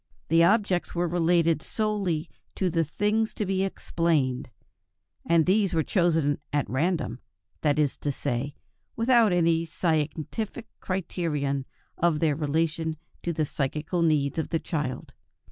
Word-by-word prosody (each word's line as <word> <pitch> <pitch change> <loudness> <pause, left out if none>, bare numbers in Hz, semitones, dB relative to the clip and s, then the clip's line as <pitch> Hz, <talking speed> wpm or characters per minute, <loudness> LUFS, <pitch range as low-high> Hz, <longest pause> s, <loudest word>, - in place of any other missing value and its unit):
The 165 +1 +5
objects 195 -2 +2
were 175 +1 +1
related 170 -1 +2
solely 195 -7 -1 0.3
to 185 -2 0
the 165 0 +2
things 210 +8 0
to 210 - -1
be 190 0 0
explained, 155 -9 0 0.8
and 165 -1 +4
these 195 -1 +2
were 160 - +2
chosen 160 -6 +2
at 145 0 0
random, 150 -3 -1 0.4
that 150 -1 +2
is 150 -3 +1
to 145 - -2
say, 135 +2 -2 0.4
without 230 -2 +4
any 165 -2 +3
scientific 165 - -2
criterion 150 -7 -2 0.3
of 170 -3 +2
their 155 -3 +2
relation 160 +1 -1 0.2
to 175 - -2
the 155 -2 0
psychical 150 +5 -2
needs 155 -2 +2
of 160 - -2
the 165 - 0
child. 145 -7 -4
165 Hz, 135 wpm, -27 LUFS, 150-180 Hz, 0.8 s, The